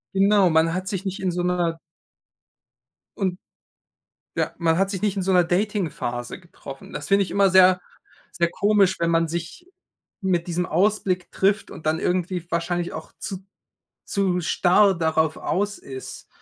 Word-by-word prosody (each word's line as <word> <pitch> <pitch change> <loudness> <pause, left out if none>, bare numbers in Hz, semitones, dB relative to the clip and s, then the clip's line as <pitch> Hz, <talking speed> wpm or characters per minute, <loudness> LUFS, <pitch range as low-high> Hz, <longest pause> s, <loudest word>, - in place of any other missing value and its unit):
Genau, 195 -1 +4
man 160 +1 +3
hat 185 +1 -3
sich 195 0 -3
nicht 190 +1 -3
in 185 -2 -1
so 175 0 -2
'ner 175 -2 0 1.4
und, 185 -3 -1 1.0
ja, - - -1
man 165 0 +2
hat 195 0 +1
sich 195 -1 -4
nicht 205 -2 0
in 195 - -1
so 190 +1 0
'ner 180 -1 +5
Dating-Phase 175 - -2
getroffen. 140 -5 -12
Das - - -6
finde 200 0 +4
ich - - -9
immer 200 -1 +3
sehr, 185 0 +6 0.5
sehr 170 0 +1
komisch, 200 -1 +2
wenn 170 0 +1
man 165 0 +2
sich 170 - -6 0.5
mit 180 -3 0
diesem 175 +1 -1
Ausblick 185 0 0
trifft 200 +2 +1
und 155 - -11
dann 155 +1 +1
irgendwie 180 -1 -1
wahrscheinlich 175 +1 -1
auch 160 - -8
zu 190 -2 -6 0.6
zu 185 -3 0
starr 185 +4 +3
darauf 160 -1 +1
aus 205 +2 -1
ist, 130 -1 -9
180 Hz, 160 wpm, -23 LUFS, 170-195 Hz, 1.4 s, sehr